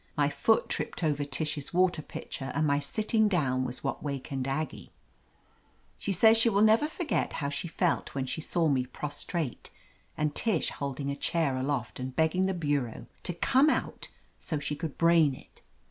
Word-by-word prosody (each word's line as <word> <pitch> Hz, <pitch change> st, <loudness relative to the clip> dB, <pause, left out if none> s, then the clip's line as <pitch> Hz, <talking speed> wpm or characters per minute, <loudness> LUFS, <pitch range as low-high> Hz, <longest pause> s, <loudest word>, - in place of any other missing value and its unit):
My -, -, +3 dB
foot 480 Hz, -, +2 dB
tripped -, -, -3 dB
over 145 Hz, -2 st, +1 dB
Tish's 145 Hz, +2 st, -3 dB
water 180 Hz, -3 st, +3 dB
pitcher, 135 Hz, -2 st, -6 dB
and 155 Hz, -, +2 dB
my 140 Hz, -1 st, +2 dB
sitting 215 Hz, +8 st, +1 dB
down 135 Hz, -10 st, +1 dB
was 125 Hz, 0 st, -4 dB
what 135 Hz, -, -2 dB
wakened 135 Hz, -2 st, -4 dB
Aggie. 145 Hz, +3 st, -3 dB, 1.1 s
She 200 Hz, -, -2 dB
says 220 Hz, +4 st, +6 dB
she 230 Hz, -, +5 dB
never 220 Hz, +5 st, +4 dB
will -, -, -3 dB
forget 325 Hz, -1 st, -1 dB
how 140 Hz, -2 st, -2 dB
she 145 Hz, +4 st, -3 dB
felt 170 Hz, -2 st, -1 dB
when 135 Hz, -1 st, -1 dB
she 160 Hz, -, -4 dB
saw 165 Hz, +1 st, +1 dB
me 130 Hz, -3 st, +1 dB
prostrate 145 Hz, +2 st, -4 dB, 0.5 s
and 150 Hz, -1 st, 0 dB
Tish 210 Hz, -4 st, +1 dB
holding 140 Hz, 0 st, -3 dB
a -, -, -3 dB
chair 150 Hz, -1 st, 0 dB
aloft 130 Hz, -2 st, -2 dB
and 130 Hz, 0 st, -5 dB
begging 160 Hz, +5 st, +2 dB
the 190 Hz, -, -1 dB
bureau 145 Hz, -8 st, -1 dB, 0.2 s
to 175 Hz, -, -1 dB
come 265 Hz, -, +4 dB
out -, -, -2 dB, 0.3 s
so 160 Hz, -, -2 dB
she 145 Hz, +1 st, -3 dB
could 155 Hz, -1 st, -5 dB
brain 165 Hz, -4 st, +4 dB
it. -, -, -17 dB
150 Hz, 175 wpm, -29 LUFS, 140-180 Hz, 1.1 s, says